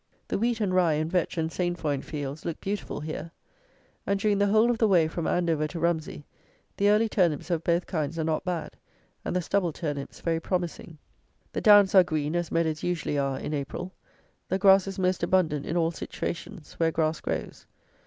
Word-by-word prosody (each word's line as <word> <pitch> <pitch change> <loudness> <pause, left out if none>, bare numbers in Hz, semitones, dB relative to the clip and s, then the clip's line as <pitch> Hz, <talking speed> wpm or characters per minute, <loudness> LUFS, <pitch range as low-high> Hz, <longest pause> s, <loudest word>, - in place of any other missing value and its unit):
The - - -1
wheat 235 +1 0
and 200 -4 0
rye 180 -4 +4
and 155 +2 -1
vetch 180 -1 0
and 160 0 -1
sainfoin 170 -6 -1
fields 145 0 -6
look 165 - -4
beautiful 200 -5 -4
here; 155 +1 -5 0.8
and, 200 0 +1
during 205 -1 +1
the 205 - +3
whole 220 +4 +4
of 230 - -2
the 225 - +4
way 175 -5 +4
from 160 +1 -3
Andover 165 -4 +1
to 165 +2 -6
Rumsey, 160 -3 -1 0.5
the 200 +1 +3
early 215 +2 +4
turnips 180 -6 +1
of 165 -2 0
both 170 +1 +1
kinds 155 -1 -3
are 160 - 0
not 155 0 -1
bad, 175 -3 -3 0.5
and - - -3
the 180 - 0
stubble 185 -1 +1
turnips 145 -3 -5
very 165 -1 0
promising. 170 -2 -3 0.6
The - - -2
downs 205 -3 +7
are 190 -2 +8
green 155 -2 -2
as 175 -1 -1
meadows 160 -2 0
usually 170 -4 -1
are 135 -1 -1
in 150 - -4
April. 150 +6 -4 0.6
The 190 - +1
grass 195 0 +5
is 195 - -5
most 185 -1 +1
abundant 170 -5 +1
in 170 - -1
all 165 -1 +2
situations, 170 +1 -6
where 165 -1 +3
grass 160 0 0
grows. - - -4
170 Hz, 195 wpm, -27 LUFS, 155-190 Hz, 0.8 s, are